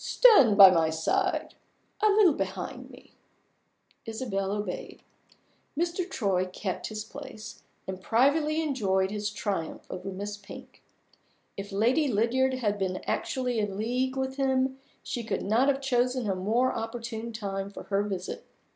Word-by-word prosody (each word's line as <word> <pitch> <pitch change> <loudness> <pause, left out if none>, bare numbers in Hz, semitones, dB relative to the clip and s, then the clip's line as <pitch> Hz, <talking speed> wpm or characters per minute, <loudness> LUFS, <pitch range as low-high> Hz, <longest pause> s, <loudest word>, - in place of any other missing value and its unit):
Stand 280 - +6
by 195 -2 +11
my 165 -3 +3
side 160 0 0 0.5
a 430 - +5
little 400 -5 +5
behind 195 +5 -5
me." 250 0 -16 0.9
Isabel 220 -4 -2
obeyed. 205 -3 -5 0.7
Mr. 345 +2 -1
Troy 195 - 0
kept 185 0 -4
his 215 -1 -5
place, 225 -3 -10 0.3
and 190 0 -5
privately 295 +9 +2
enjoyed 195 -10 0
his 210 0 -2
triumph 200 -5 -4
over 185 +2 -5
Miss 205 +2 -5
Pink. 205 - -12 0.7
If 200 +1 -7
Lady 245 +10 +2
Lydiard 255 +3 +2
had 210 -5 -1
been 185 -1 -2
actually 250 -3 -1
in 205 -2 -2
league 250 +4 -1
with 265 0 -2
him, 265 -1 +1 0.2
she 240 - -4
could 220 - -2
not 225 +7 +2
have 280 -1 +2
chosen 250 -2 +1
a 195 - +1
more 220 +8 +1
opportune 230 0 -5
time 195 -3 -4
for 200 - -9
her 200 0 0
visit. 195 -3 -5
225 Hz, 145 wpm, -28 LUFS, 195-260 Hz, 0.9 s, by